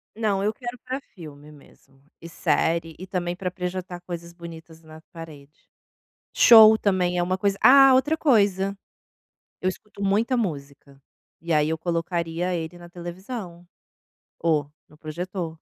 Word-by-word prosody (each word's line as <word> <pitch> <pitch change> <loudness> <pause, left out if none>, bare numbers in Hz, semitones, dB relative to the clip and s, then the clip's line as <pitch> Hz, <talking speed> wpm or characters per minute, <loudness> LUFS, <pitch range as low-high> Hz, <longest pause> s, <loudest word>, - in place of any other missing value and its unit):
Não, 205 -3 -1
eu 215 +1 0
quero 245 +1 -7
para 260 +1 -5
filme 150 -4 -12
mesmo, 135 -2 -21 0.2
e 165 - -9
série, 165 -1 -1
e 185 - -8
também 175 -2 -3
para 185 -1 -4
projetar 180 -1 -6
coisas 170 -1 -8
bonitas 165 -1 -12
na 160 0 -14
parede. 155 -3 -13 0.7
Show 220 -2 +8
também 180 -4 0
é 175 - +1
uma 185 +1 -1
coisa 200 0 0
ah, 270 0 +8
outra 290 +5 +2
coisa, 200 - +2 0.9
eu 185 - 0
escuto 200 +1 -8
muita 215 +6 +1
música, 140 - -5 0.4
e 165 0 -3
aí 150 0 +2
eu 160 - -1
colocaria 170 +1 -2
ele 165 +1 -5
na 175 0 -13
televisão 175 +1 -8 0.7
ou 150 -3 0 0.2
no 150 - -21
projetor. 170 +2 -5
175 Hz, 145 wpm, -24 LUFS, 165-200 Hz, 0.9 s, Show